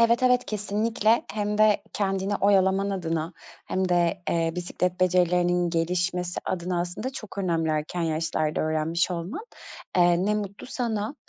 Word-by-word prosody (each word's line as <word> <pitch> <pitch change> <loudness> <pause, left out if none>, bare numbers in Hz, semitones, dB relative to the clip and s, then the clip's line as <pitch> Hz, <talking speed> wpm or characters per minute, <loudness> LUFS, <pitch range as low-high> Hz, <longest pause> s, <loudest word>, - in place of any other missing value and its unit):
Evet, 235 +2 +4
evet, 250 0 +4
kesinlikle. 215 +2 +1
Hem 210 0 -2
de 215 -1 +4
kendini 195 0 -1
oyalaman 195 0 +3
adına 165 -3 -2 0.3
hem 185 0 0
de, 175 +1 +1
eee, 165 -1 +1
bisiklet 180 0 -2
becerilerinin 180 -1 +2
gelişmesi 180 +1 -1
adına 180 -1 -2
aslında 180 +9 -3
çok 215 -5 -8
önemli 165 -4 0
erken 155 +3 -2
yaşlarda 160 -1 -1
öğrenmiş 155 +3 0
olman, 180 - -4 0.5
eee, 175 +1 +4
ne 210 - +2
mutlu 200 0 -5
sana. 230 -1 -2
180 Hz, 140 wpm, -26 LUFS, 170-205 Hz, 0.5 s, Evet